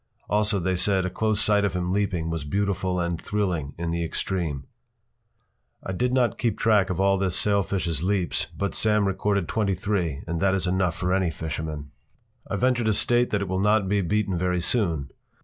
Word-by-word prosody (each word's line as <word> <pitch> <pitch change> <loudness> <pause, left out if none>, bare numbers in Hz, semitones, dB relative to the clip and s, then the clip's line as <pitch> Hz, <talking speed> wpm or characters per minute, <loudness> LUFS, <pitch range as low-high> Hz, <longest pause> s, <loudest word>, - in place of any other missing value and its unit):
Also 105 -1 +1
they 95 +1 0
said 95 +1 +2
a 95 - -2
close 110 +2 0
sight 105 -2 +3
of 100 -3 0
him 90 0 -1
leaping 95 -5 -1
was 80 -3 -3
beautiful 95 +2 -1
and 85 -1 -2
thrilling 90 -9 -2
in 85 0 -3
the 85 0 -1
extreme. 80 -4 -2 1.2
I - - -4
did 125 +6 0
not 125 -2 +1
keep 115 -4 0
track 105 -4 +3
of 90 -1 -2
all 95 0 +3
this 95 -2 0
sailfish’s 95 -6 +1
leaps, 95 -1 0
but 100 -1 -2
Sam 105 -2 +2
recorded 100 -1 0
twenty 100 -4 0
three, 90 -7 -2
and 85 0 -3
that 95 +2 +2
is 95 -2 0
enough 90 -2 +1
for 90 0 -1
any 95 -2 +2
fisherman. 80 -2 -5 0.6
I - - -1
venture 125 -1 +1
to 110 -1 +2
state 120 +4 +3
that 105 - 0
it - - -5
will 95 +1 -1
not 105 0 +3
be 100 +1 +1
beaten 100 +1 0
very 90 +1 0
soon. 85 - 0
95 Hz, 195 wpm, -25 LUFS, 85-105 Hz, 1.2 s, sight